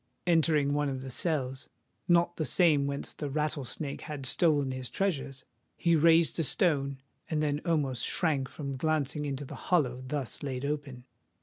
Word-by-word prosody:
Entering 155 -4 +3
one 145 0 +1
of 130 -1 -4
the 130 - -6
cells,—not 160 +4 -1
the 160 - 0
same 150 -5 +4
whence 140 0 -4
the 145 - -5
Rattlesnake 150 -1 -2
had 145 -3 -6
stolen 145 -1 +2
his 130 -1 -4
treasure,—he 140 - -2
raised 165 0 +4
a - - +2
stone, 140 -3 +2 0.3
and 155 -2 0
then 145 0 0
almost 140 -8 0
shrank 145 -6 0
from 140 -3 -5
glancing 150 0 0
into 140 0 -3
the - - -9 0.2
hollow 130 -8 +2
thus 140 -3 -3
laid 135 -1 -3
open. 140 -4 -4
145 Hz, 150 wpm, -30 LUFS, 135-160 Hz, 0.3 s, same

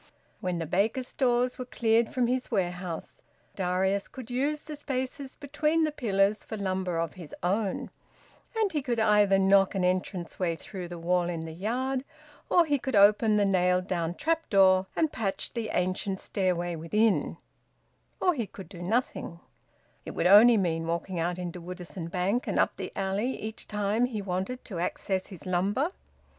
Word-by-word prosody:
When 180 -1 -2
the 165 - -2
baker's 220 - 0
stores 250 -2 +1
were 255 - -3
cleared 230 -1 +2
from 250 -2 +1
his 250 +1 -1
warehouse, 180 -5 -3 0.3
Darius 190 +1 0
could 255 -2 -10
use 290 +4 0
the 305 0 -7
spaces 265 -1 -4
between 305 +3 0
the 310 - +1
pillars 205 -6 +1
for 220 - -6
lumber 185 -3 -1
of 165 -2 -1
his 175 -5 -10
own; 195 +2 -1 0.7
and 430 -3 +2
he 300 - -1
could 240 -3 -1
either 210 -2 +4
knock 195 0 +4
an 190 - 0
entrance 180 -1 -1
way 170 -3 0
through 180 +3 -7
the 175 0 -7
wall 175 +1 +1
in 170 -2 -3
the 160 0 -6
yard, 255 +8 -1 0.5
or 350 -1 +5
he 290 -2 +1
could 265 -2 -2
open 210 +2 +5
the 205 - +3
nailed 180 -1 +2
down 170 -2 -2
trap 325 - -1
door 190 -1 +5
and 315 -2 +1
patch 205 -5 -3
the 230 -3 -3
ancient 185 +2 -1
stairway 175 -3 -1
within; 210 +7 +1 0.8
or 360 - +3
he 235 -8 -3
could 190 -4 -11
do 175 -3 -10
nothing 185 -3 -1 0.6
it - - -8
would - - 0
only 215 +5 +8
mean 165 -4 0
walking 170 +2 -2
out 175 +2 -1
into 180 -1 -5
Woodisun 180 -1 -7
Bank 195 +7 0
and - - -1
up - - +2
the - - -5
alley 200 +6 -1
each 220 +1 -6
time 210 +3 +1
he 230 -4 -4
wanted 195 +6 -3
access 185 +1 -2
to - - -14
his 180 -7 -10
lumber! 200 - 0
195 Hz, 175 wpm, -28 LUFS, 180-245 Hz, 0.8 s, only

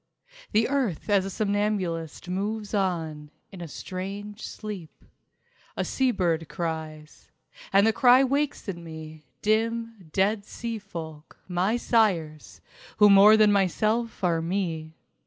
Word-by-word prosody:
The 220 +2 +3
earth 250 - -1
as 195 -2 +3
a - - -3
somnambulist 200 -6 -2
moves 205 +4 -3
on 165 -7 -2 0.2
In 190 -3 -10
a 170 - -5
strange 200 +6 -7
sleep... 200 -7 -8 0.7
A - - 0
sea 265 -1 +1
bird 165 -8 0
cries. 160 -2 -6 0.4
And 195 +1 +5
the 225 - +3
cry 250 +3 +6
wakes 280 0 -1
in 170 -3 -5
me 160 -1 -9 0.2
Dim, 225 -3 -1
dead 200 +3 +1
sea 230 +2 -5
folk, 160 -6 -9
my 185 +5 +1
sires 180 -11 0 0.4
Who 210 -1 +7
more 205 +2 +8
than 215 -1 +5
myself 215 +4 0
are 170 -2 +2
me. 165 -3 -3
195 Hz, 130 wpm, -26 LUFS, 165-215 Hz, 0.7 s, more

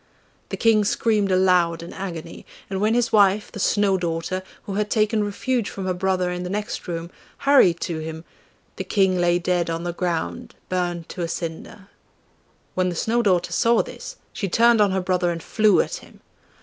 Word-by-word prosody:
The - - -4
King 220 -2 +4
screamed 210 -1 +1
aloud 180 -3 +3
in 170 - -9
agony, 170 -4 -7 0.3
and 190 0 -2
when 215 +2 +2
his 240 -1 +1
wife, 205 0 +3
the - - -8
Snow 200 -1 +2
daughter, 170 +2 -2 0.2
who 200 - -6
had 210 +1 -1
taken 215 -1 +1
refuge 230 +3 -1
from 195 - -6
her 185 - 0
brother 185 0 0
in 180 0 -4
the 180 - -4
next 210 +1 -4
room, 170 0 -5 0.3
hurried 225 -12 +5
to 165 -3 -3
him, 160 0 -6 0.5
the - - -3
King 190 -3 +2
lay 175 0 +3
dead 175 -1 0
on 165 0 -3
the 175 0 -3
ground 165 - -3
burnt 175 -2 -2
to - - -6
a 170 - -1
cinder. 170 +4 -6 0.9
When 185 0 +1
the 175 - -4
Snow 230 +7 +1
daughter 185 -5 +1
saw 235 0 +3
this - - -9 0.2
she 195 - -3
turned 230 +3 +4
on 205 - +4
her 190 0 0
brother 180 -1 0
and 165 -1 -4
flew 215 -4 +3
at - - -4
him. - - -17
185 Hz, 190 wpm, -23 LUFS, 175-210 Hz, 0.9 s, hurried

